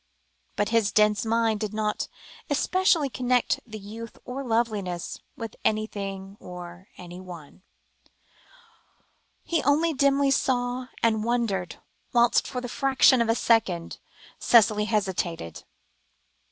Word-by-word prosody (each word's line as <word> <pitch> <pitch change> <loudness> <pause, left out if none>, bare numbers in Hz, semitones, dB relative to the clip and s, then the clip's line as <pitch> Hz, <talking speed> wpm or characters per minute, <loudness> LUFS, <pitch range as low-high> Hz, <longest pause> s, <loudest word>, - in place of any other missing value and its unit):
But 205 +1 0
his 225 -3 +2
dense 210 0 +3
mind 225 -1 +1
did 215 0 -4
not 215 -1 -1 0.4
especially 330 +1 +2
connect 250 -1 0
the 220 -1 -7
youth 220 +3 -9
or 260 +2 -5
loveliness 215 -7 -2 0.2
with 225 -3 -6
anything 200 -2 -3
or 180 +1 -10
anybody; 175 -2 -11 1.8
he 335 - 0
only 315 +3 +2
dimly 280 0 +3
saw 250 -1 0 0.2
and 220 -2 +2
wondered, 225 -7 -1 0.4
whilst 240 -1 +4
for 250 - -4
the 245 - -5
fraction 265 0 +4
of 230 - 0
a 225 - +3
second 200 -9 +1 0.4
Cicely 215 -2 +4
hesitated. 190 - -2
225 Hz, 115 wpm, -26 LUFS, 195-245 Hz, 1.8 s, whilst